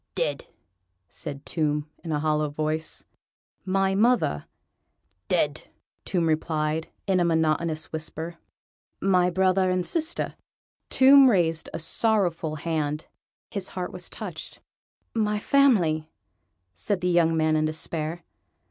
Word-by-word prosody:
"Dead," - - -2 0.6
said 145 -2 -7
Tomb, 150 -2 -1 0.2
in 165 - -4
a 150 - 0
hollow 150 0 +1
voice. 155 +2 -3 0.6
"My 195 0 +1
mother.. 210 - +2 0.4
." - - -33
"Dead," - - 0 0.4
Tomb 175 -3 0
replied, 155 0 -1 0.2
in 190 -2 +2
a - - +3
monotonous 160 -1 0
whisper. 160 +2 -5 0.6
"My 180 -2 +3
brother 185 +1 +2
and 185 -1 0
sister.. 330 - -1 0.3
." - - -58
Tomb 270 0 +7
raised 165 -6 +1
a - - -4
sorrowful 170 -3 +1
hand: 155 -1 -2 0.5
his 200 -2 -3
heart 180 -1 -3
was 180 -1 -6
touched. - - -7 0.5
"My 210 -2 +1
family.. 195 - +3 0.3
." - - -48 0.3
said 175 - -2
the 180 - 0
young 165 -2 +3
man 155 0 +2
in 155 0 +2
despair. 155 +2 -3
165 Hz, 130 wpm, -26 LUFS, 155-190 Hz, 0.6 s, Tomb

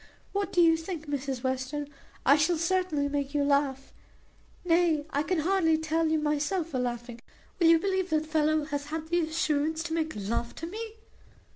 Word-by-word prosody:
What 400 0 -2
do 355 - +3
you 325 -1 +5
think, 325 -1 -6
Mrs 275 -3 -3
Western 260 +3 -2 0.4
I 280 - +7
shall 310 +3 +2
certainly 335 -3 0
make 285 0 -3
you 290 - +2
laugh; 280 -1 0 0.7
nay, 330 -3 +3
I 285 - +1
can 365 +4 -1
hardly 330 -2 +2
tell 320 +1 0
you 315 0 +2
myself 300 +3 0
for 265 -5 -2
laughing 240 -1 -4 0.4
will 340 - +5
you 330 0 +7
believe 375 +1 -1
that 310 -1 +1
the - - -13
fellow 310 0 +2
hath 285 -1 -4
had 320 +1 -5
the 345 +1 +2
assurance 315 -1 0
to 325 - -4
make 320 -1 -1
love 225 +3 -3
to - - -6
me? 435 +5 -6
310 Hz, 185 wpm, -28 LUFS, 285-335 Hz, 0.7 s, I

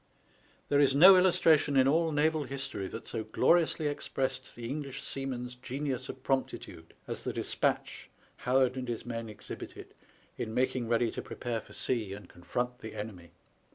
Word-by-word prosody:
There 145 - +4
is 140 -2 +4
no 185 +6 +10
illus 180 -1 +4
tration 145 -3 +4
in 130 - +5
all 160 +3 +3
naval 155 0 +2
history 135 -7 -4
that 115 - -8
so 110 - -3
gloriously 160 +8 +2
expressed 130 -2 -3
the 115 -1 -6
English 140 0 -5
seaman's 130 -3 -5
genius 130 +1 -4
of 130 - -8
promptitude 135 -1 -3
as - - -4
the - - -2
despatch - - -2 0.3
Howard 130 0 +2
and 130 -1 -4
his 120 -2 -4
men 115 -2 -4
exhibited 105 -1 -9 0.5
in 110 - -3
making 125 -1 +1
ready 115 0 +2
to - - -5
prepare 115 -2 -4
for - - -15
sea 110 -6 +2
and 100 -2 -9
confront 125 +8 -3
the 110 -2 -8
enemy. 95 -5 -7
130 Hz, 165 wpm, -31 LUFS, 115-140 Hz, 0.5 s, no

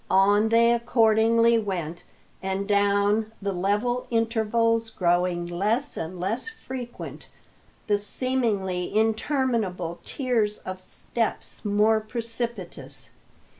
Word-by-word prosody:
On 205 +3 +4
they 235 +1 +5
accordingly 230 0 +4
went, 175 -6 -4 0.4
and 190 +1 -2
down, 205 +1 +2
the 200 0 -2
level 205 +7 0
intervals 230 0 +1
growing 175 -2 +1
less 210 +11 0
and 170 +3 -5
less 220 - -2
frequent, 260 - -8 0.6
the 205 -1 +2
seemingly 205 -5 0
interminable 220 - 0
tiers 230 -6 0
of 185 0 -7
steps 225 +4 -3
more 210 +2 +3
precipitous. 215 - -5
215 Hz, 95 wpm, -25 LUFS, 190-230 Hz, 0.6 s, they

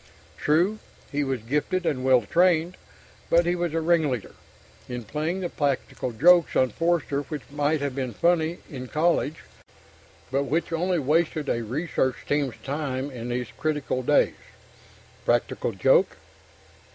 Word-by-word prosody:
True, 175 +8 +2 0.3
he 145 0 0
was 135 -5 -2
gifted 150 +9 -1
and 130 -5 0
well 130 -2 +4
trained, 175 - +2 0.5
but 170 +1 +4
he 175 +1 +1
was 175 -2 -2
a 165 - +1
ringleader 155 - +1 0.6
in 125 -1 -4
playing 155 - -3
the 175 - -2
practical 140 -4 -2
jokes 170 +8 +5
on 130 -2 +3
Forster 165 -2 0
which 145 -1 -6
might 145 +1 0
have 140 -2 -2
been 130 -4 -4
funny 170 +2 +2
in 130 -4 -7
college, 160 +1 0 0.9
but 140 +1 +1
which 160 +3 -1
only 180 +2 +1
wasted 155 +1 +1
a 115 - 0
research 130 +1 -1
team's 145 -4 0
time 140 -1 -3
in 120 -1 -6
these 125 -1 -2
critical 150 -4 -1
days. 145 +4 +3 0.9
Practical - - 0
joke. - - +3
150 Hz, 140 wpm, -25 LUFS, 130-170 Hz, 0.9 s, jokes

